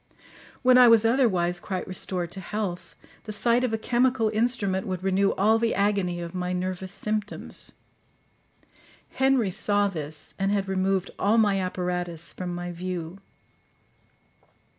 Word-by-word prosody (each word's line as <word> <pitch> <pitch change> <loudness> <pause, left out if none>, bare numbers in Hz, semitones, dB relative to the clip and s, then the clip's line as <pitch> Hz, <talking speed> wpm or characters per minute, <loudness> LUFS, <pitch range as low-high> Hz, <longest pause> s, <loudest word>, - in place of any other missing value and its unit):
When 255 0 +6
I 250 - +9
was 230 -1 +6
otherwise 190 -8 +2
quite 185 0 -4
restored 180 -2 -3
to 195 - -7
health, 190 -2 -4 0.3
the 215 - -5
sight 235 +4 +2
of 250 - 0
a 225 - 0
chemical 240 0 +2
instrument 215 -4 0
would 185 -1 -4
renew 195 +1 +2
all 220 +3 +3
the 230 0 +1
agony 195 -4 +1
of 170 0 -6
my 180 0 -2
nervous 185 0 -3
symptoms. 210 +1 -4 1.4
Henry 265 -6 +2
saw 205 +2 +1
this, 155 -4 -7
and 195 +1 +1
had 200 -1 0
removed 190 0 0
all 210 +3 +3
my 205 -3 +3
apparatus 180 -2 -3
from 180 -1 -5
my 175 0 -5
view. 175 0 -5
195 Hz, 140 wpm, -26 LUFS, 180-220 Hz, 1.4 s, I